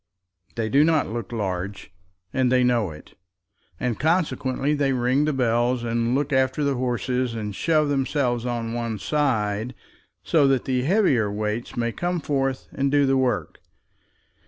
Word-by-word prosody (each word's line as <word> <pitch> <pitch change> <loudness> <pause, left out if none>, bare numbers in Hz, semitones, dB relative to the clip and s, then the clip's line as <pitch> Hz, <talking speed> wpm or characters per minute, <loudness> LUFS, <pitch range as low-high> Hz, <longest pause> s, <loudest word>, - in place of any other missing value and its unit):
They 115 -2 -1
do 140 +6 +4
not 160 -1 +2
look 115 -2 -5
large, 100 -3 -4 0.4
and 130 -1 +2
they 130 0 +4
know 120 -5 +2
it; 75 -1 -12 0.7
and 125 -3 -2
consequently 150 -4 0
they 140 -2 +1
ring 130 +3 +2
the 155 - +1
bells, 120 -1 +1
and 115 +1 0
look 145 +1 -1
after 130 +2 +1
the 140 -1 +1
horses, 125 -1 -1
and 105 -3 -4
shove 155 +2 +2
themselves 135 -3 0
on 120 -2 -3
one 115 -2 -3
side, 115 -3 -1 0.5
so 150 -4 +3
that 135 -2 +1
the 130 -1 0
heavier 135 - +2
weights 105 +4 -3
may 115 -1 0
come 175 +6 -2
forth 135 -3 -1
and 140 0 -1
do 145 -1 +4
the 135 0 +2
work. 130 -2 -1
125 Hz, 155 wpm, -24 LUFS, 115-140 Hz, 0.7 s, do